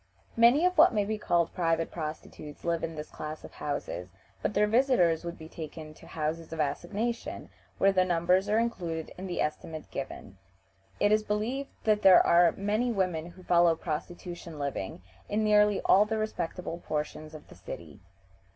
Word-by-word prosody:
Many 240 +8 +5
of 365 -2 +1
what 320 -7 +7
may 205 -1 +2
be 215 +1 -2
called 170 -4 +1
private 165 -2 0
prostitutes 155 -2 -7
live 170 -1 0
in 165 0 -3
this 150 0 -7
class 155 0 -7
of - - -10
houses, 95 -10 -4 0.3
but 210 - -2
their 210 - +4
visitors 210 -8 +3
would 170 0 -5
be 160 - -10
taken 155 -1 -8
to - - -16
houses 160 +1 -3
of 165 - -6
assignation, 195 +11 -2 0.3
where 195 - +4
the 185 -1 +3
numbers 180 +2 +2
are 215 - +3
included 175 -9 -2
in 190 +1 -7
the 175 - -4
estimate 155 +1 -4
given. 100 -8 -7 0.6
"It 205 - +3
is 215 0 +4
believed 225 +7 -2
that 210 -1 +2
there 190 -2 +7
are 170 0 +6
many 215 +5 0
women 180 -6 -1
who 180 +1 -14
follow 170 -2 +4
prostitution 170 +1 -6
living 140 -11 -4 0.3
in 215 +1 0
nearly 210 -1 +4
all 200 +2 +5
the 220 +1 -2
respectable 180 -5 -3
portions 155 +1 -4
of 155 - -12
the - - -13
city. - - -9
175 Hz, 175 wpm, -29 LUFS, 160-210 Hz, 0.6 s, what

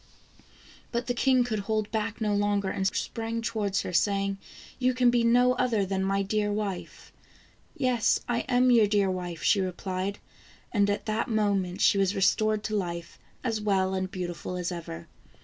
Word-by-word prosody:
But 235 +1 -2
the 245 - -1
king 255 +1 +3
could 220 -3 -2
hold 215 +1 -2
back 220 0 -2
no 210 -2 0
longer, 205 -1 +1
and 190 - 0
sprang 230 +3 -3
to 230 0 -3
wards 200 -2 0
her, 180 - -5
saying: 195 +1 +1 0.2
" - - -19
You 255 0 +2
can 250 -1 +4
be 240 -1 +2
no 245 +2 +4
other 245 -5 +1
than 190 0 -1
my 195 +1 +1
dear 205 +1 0
wife! 205 -3 -5 0.2
" - - -28
" - - -35
Yes, 255 -4 +2
I 240 -1 0
am 250 0 +4
your 225 -3 +5
dear 200 -2 +2
wife," 175 -3 -5
she 200 - +4
replied, 185 +2 -3 0.5
and 205 -2 +2
at 205 - -1
that 215 +1 -1
moment 200 -4 0
she 200 - +4
was 195 0 +1
restored 215 +2 +2
to 215 - -2
life, 170 -4 -4 0.2
as 225 -4 -1
well 190 -2 +1
and 185 0 -2
beautiful 180 -1 -5
as 180 0 -2
ever. 125 - -7
205 Hz, 190 wpm, -27 LUFS, 190-230 Hz, 0.5 s, your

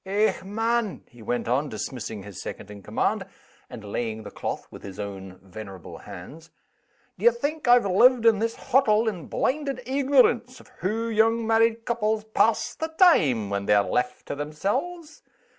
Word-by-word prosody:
Eh, 205 +3 +2
man!" 225 +1 -1
he 120 - -16
went 120 +2 -2
on, 135 +5 +1
dismissing 110 -5 -5
his 100 -2 -9
second 105 - -8
in 100 -1 -10
command, - - -1 0.5
and 115 -3 -9
laying 110 +1 -3
the 100 - -9
cloth - - -4
with - - -11
his 100 0 -9
own 95 -2 -7
venerable 95 -1 -10
hands, 155 - -11 0.7
"d'ye 475 - +6
think 315 - -3
I've 245 -2 +6
lived 235 +5 +4
in 225 -3 +5
this 230 +1 -1
hottle 235 -4 +2
in 180 -8 -3
blinded 275 0 -1
eegnorance 260 -2 +2
of - - -17
hoo 220 +6 -1
young 225 +1 +2
married 225 +1 +2
couples 220 -2 0
pass 220 +1 +1
the 320 - -3
time 155 - +3
when 100 0 -2
they're 105 -1 +5
left 125 +3 -2
to - - -4
themselves? 260 - -3
215 Hz, 160 wpm, -25 LUFS, -, 0.7 s, d'ye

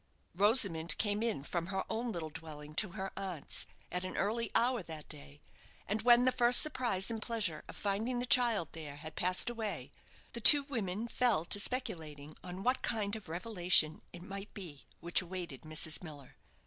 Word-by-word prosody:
Rosamond 195 -4 +4
came 205 0 -1
in 225 -12 -2
from 170 +2 -4
her 190 0 -3
own 230 +2 -3
little 165 -5 -5
dwelling 150 -1 -10
to 185 +2 0
her 195 -2 -5
aunt's, 185 -6 -4 0.2
at 180 0 -3
an 185 - -6
early 230 +4 -1
hour 245 -1 +2
that 160 -3 -10
day, 70 +1 -10 0.4
and 215 +2 -2
when 240 +1 +5
the 255 - +4
first 240 0 +5
surprise 240 -9 +1
and 225 -1 -5
pleasure 210 -10 -2
of - - -10
finding 215 +5 -2
the 245 - -2
child 235 -7 +3
there 150 -3 -9
had 155 +1 -10
passed 185 +1 +2
away, 225 -3 -5 0.4
the 235 - -6
two 290 +5 +10
women 225 -6 -4
fell 235 -9 0
to 205 - +4
speculating 155 - -4
on 185 +1 -8
what 255 +3 +1
kind 210 -2 -2
of 215 -6 -10
revelation 175 -3 +3
it 175 0 -11
might 195 +1 -7
be 165 -8 -9
which 170 0 +2
awaited 175 -6 -7
Mrs. 155 0 0
Miller. 145 -6 -11
195 Hz, 180 wpm, -33 LUFS, 160-230 Hz, 0.4 s, two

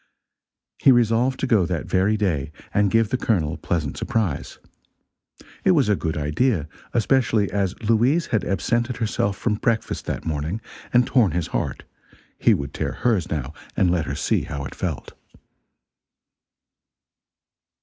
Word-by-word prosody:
He 135 - +6
resolved 120 +2 +3
to - - +1
go 110 -9 +3
that 85 -4 -2
very 95 +3 +2
day, 80 -9 -1 0.2
and 100 0 +3
give 115 -1 +2
the 130 - -1
Colonel 80 -9 +1
a - - -6
pleasant 80 -5 -2
surprise. 95 -11 -2 1.1
It 190 - +5
was 140 -9 +3
a 105 - +4
good 80 -4 -3
idea; 75 - 0 0.2
especially 115 -3 +2
as 100 -2 -1
Louise 120 +9 +3
had 105 -4 +2
absented 120 +6 0
herself 105 -3 -1
from 115 - 0
breakfast 115 -2 -1
that - - -3
morning, 80 +6 -2 0.3
and 125 0 +4
torn 120 -7 +3
his 85 -2 0
heart; - - -2 0.6
he - - +5
would 70 0 -5
tear - - -2
hers, 110 -9 0
now, 75 -2 -3 0.2
and 90 -2 +3
let 85 -3 +1
her - - -3
see - - +1
how 70 -2 -5
it - - -7
felt. - - -4
105 Hz, 150 wpm, -23 LUFS, 80-120 Hz, 1.1 s, He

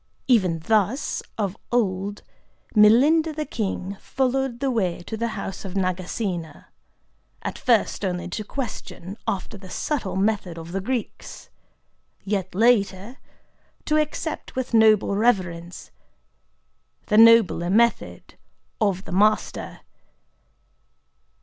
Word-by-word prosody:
Even 190 -10 +3
thus, 220 - 0 0.2
of 200 -3 -2 0.2
old, 200 -3 -1 0.5
Milinda 285 +10 +5
the 305 0 -3
king 200 -4 -4
followed 265 -1 -1
the 270 0 0
way 185 -7 -1
to 220 - -5
the 230 +1 -1
house 195 -1 -6
of 195 -1 -7
Nagasena,—at 185 -3 -3 0.9
first 230 -3 +1
only 180 -2 -2
to 215 +4 -4
question, 205 -6 -6
after 195 +1 -3
the 190 -1 -12
subtle 240 -3 -3
method 195 -3 0
of 165 +1 -8
the 195 +2 -2
Greeks; 240 +2 -5 0.7
yet, 195 -3 -3
later, 215 0 +2 0.7
to 305 - +2
accept 305 +1 -3
with 260 -1 -3
noble 215 -3 +4
reverence 180 -6 -1 1.1
the 210 - +1
nobler 225 -7 +6
method 235 +4 +1 0.5
of 195 -3 0
the - - -9
Master. 210 +4 +1
210 Hz, 110 wpm, -23 LUFS, 185-235 Hz, 1.1 s, nobler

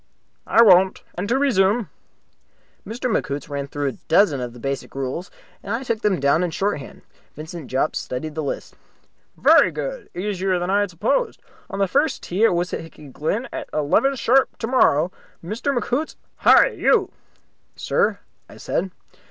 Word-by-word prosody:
"I 230 - +6
won't. 190 -2 +5
And 195 +3 -4
to 250 - +2
resume." 220 -5 +2 1.0
Mr. 235 +4 -6
McHoots 145 - -2
ran 140 -1 -4
through 145 0 -3
a - - 0 0.2
dozen 160 -5 +3
of 120 -1 -4
the 120 - -13
basic 135 +2 -4
rules, 135 +7 -4 0.3
and 205 +3 -3
I 250 - -4
took 230 -3 -2
them 205 -4 +1
down 140 +4 +3
in 180 - 0
shorthand. 180 -5 -3 0.3
Vincent 155 -1 -8
Jopp 135 +4 0
studied 150 +5 -4
the 155 - -3
list. 140 - -5 0.6
"Very - - +6
good. - - -5
Easier 190 0 -1
than 175 +1 -2
I 200 - +3
had 205 -1 0
supposed. 225 - -1 0.3
On 195 - -5
the 200 -1 +2
first 285 - 0
tee 190 +5 -1
at - - +4
Wissahicky 165 -4 -5
Glen 205 - -2
at - - -6
eleven 155 - +2
sharp 260 +1 +2
tomorrow, 185 - +2 0.3
Mr. 220 +9 -2
McHoots. 255 +6 -2 0.2
Hi! - - +6
You!" - - +2 0.6
"Sir?" - - 0 0.3
I - - -13
said. 190 +3 -2
185 Hz, 160 wpm, -22 LUFS, 150-230 Hz, 1.0 s, I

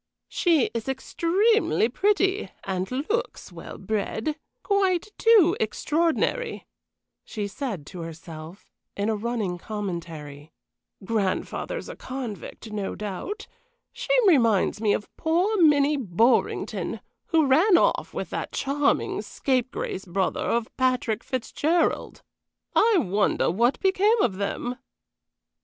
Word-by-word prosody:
"She 330 -8 +2
is 230 +2 -3
extremely 360 - +2
pretty 390 - +1
and 190 -1 -2
looks 365 - -3
well - - -9
bred 220 +6 -2 0.3
quite 390 -2 +1
too 430 -7 +6
extraordinary," 330 - 0 0.6
she 210 -3 -4
said 200 - -5
to 180 - -9
herself, 165 +2 -10 0.3
in 200 +2 0
a 220 - +1
running 210 -5 -2
commentary. 165 -8 -6 0.5
"Grandfather 215 - -1
a - - -7
convict, 240 -4 -7
no 205 -2 -3
doubt. 215 - -5 0.5
She - - -8 0.2
reminds 230 - +3
me 215 -2 +3
of 210 - -2
poor 350 +7 +1
Minnie 295 -2 +5
Borringdon, 230 +1 +1 0.3
who 320 -2 +3
ran 335 +8 +5
off - - +1
with - - -5
that - - -4
charming 280 +1 0
scapegrace 255 -7 -2
brother 185 +1 -1
of 235 -1 -1
Patrick 250 -4 +1
Fitzgerald. 290 +6 -1 0.5
I 455 -1 +5
wonder 200 - +1
what 235 +8 +2
became 405 +4 +3
of 195 -6 +1
them?" 240 +5 -3
250 Hz, 110 wpm, -25 LUFS, 200-335 Hz, 0.6 s, too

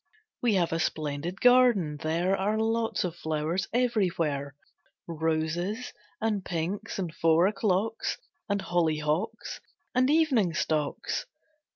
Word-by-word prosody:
We 235 -4 +3
have 175 -3 +1
a 165 - 0
splendid 155 +2 -2
garden, 245 -11 +5
there 170 +5 0
Are 205 +3 0
lots 225 +1 0
of 175 -2 -3
flowers 160 +2 -2
everywhere; 170 - 0 0.5
Roses, 165 +7 -2 0.3
and 215 -3 0
pinks, 175 +3 -3
and 180 -5 -3
four 165 +1 +4
o'clocks 210 +2 0 0.3
And 200 -1 0
hollyhocks, 165 +5 -1 0.3
and 255 +1 +3
evening 270 - +3
stocks. 150 -2 -1
180 Hz, 110 wpm, -28 LUFS, 160-220 Hz, 0.5 s, garden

